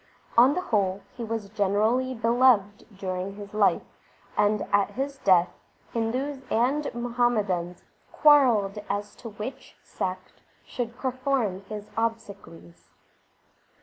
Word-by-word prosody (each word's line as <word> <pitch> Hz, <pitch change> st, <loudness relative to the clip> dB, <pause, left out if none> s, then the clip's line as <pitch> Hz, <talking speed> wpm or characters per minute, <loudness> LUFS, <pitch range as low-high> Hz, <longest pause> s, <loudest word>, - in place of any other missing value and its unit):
On 255 Hz, +5 st, +6 dB
the 365 Hz, -, 0 dB
whole 200 Hz, -, 0 dB
he 240 Hz, -, -6 dB
was 225 Hz, -3 st, -4 dB
generally 220 Hz, +5 st, +1 dB
beloved 230 Hz, -3 st, +2 dB
during 185 Hz, 0 st, -4 dB
his 205 Hz, 0 st, -10 dB
life, 210 Hz, -1 st, +3 dB, 0.5 s
and 210 Hz, 0 st, +2 dB
at 200 Hz, -1 st, +3 dB
his 275 Hz, +2 st, -4 dB
death 180 Hz, -5 st, +4 dB, 0.4 s
Hindus 255 Hz, +5 st, -2 dB
and 265 Hz, +6 st, +1 dB
Muhammadans 215 Hz, -8 st, -1 dB, 0.3 s
quarrelled 240 Hz, -10 st, +4 dB
as 205 Hz, +1 st, -3 dB
to 230 Hz, -, -8 dB
which 220 Hz, +6 st, -8 dB
sect 185 Hz, 0 st, -5 dB, 0.2 s
should 240 Hz, -1 st, -5 dB
perform 255 Hz, -7 st, -1 dB
his 210 Hz, -1 st, -7 dB
obsequies. 200 Hz, -, -5 dB
220 Hz, 115 wpm, -26 LUFS, 200-250 Hz, 0.5 s, On